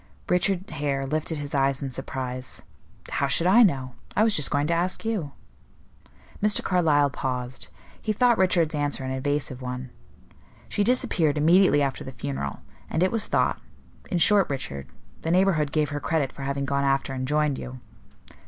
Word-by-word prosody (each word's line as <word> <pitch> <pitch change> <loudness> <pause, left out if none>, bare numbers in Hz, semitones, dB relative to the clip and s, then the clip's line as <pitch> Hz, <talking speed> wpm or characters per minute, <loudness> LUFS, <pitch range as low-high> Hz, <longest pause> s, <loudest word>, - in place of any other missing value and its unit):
Richard 185 +1 +1
Hare 140 -2 -1
lifted 155 +3 -2
his 145 0 -6
eyes 135 -1 +2
in 135 - -4
surprise. 130 0 -5 0.5
"How 140 - +1
should 140 +5 +2
I 200 +7 +6
know? 135 - +2 0.2
I 215 - +4
was 220 -1 +3
just 150 - +2
going 145 0 +1
to 170 - +1
ask 180 +6 -1
you." 195 -11 -2 1.1
Mr. 210 0 +3
Carlyle 150 -6 +3
paused. 125 -1 -4 0.3
He 215 - -1
thought 240 +2 +3
Richard's 175 -4 +3
answer 145 -2 -1
an 130 - -3
evasive 135 -1 -2
one. 125 0 -5 0.8
"She 205 - 0
disappeared 170 - +2
immediately 165 -1 +5
after 135 -3 -2
the 130 - -7
funeral; 70 - -4 0.3
and 165 - +1
it 185 - +2
was 225 -2 0
thought - - +1 0.5
in 180 - 0
short, 200 +3 +4
Richard, 70 - -5 0.3
the 160 - -3
neighborhood 170 -5 +2
gave 155 -1 +1
her 145 - -3
credit 145 -4 0
for - - -11
having 140 0 -2
gone 140 +1 0
after 135 0 +1
and 130 0 -3
joined 150 -1 +1
you." 130 0 -7
145 Hz, 170 wpm, -25 LUFS, 135-175 Hz, 1.1 s, I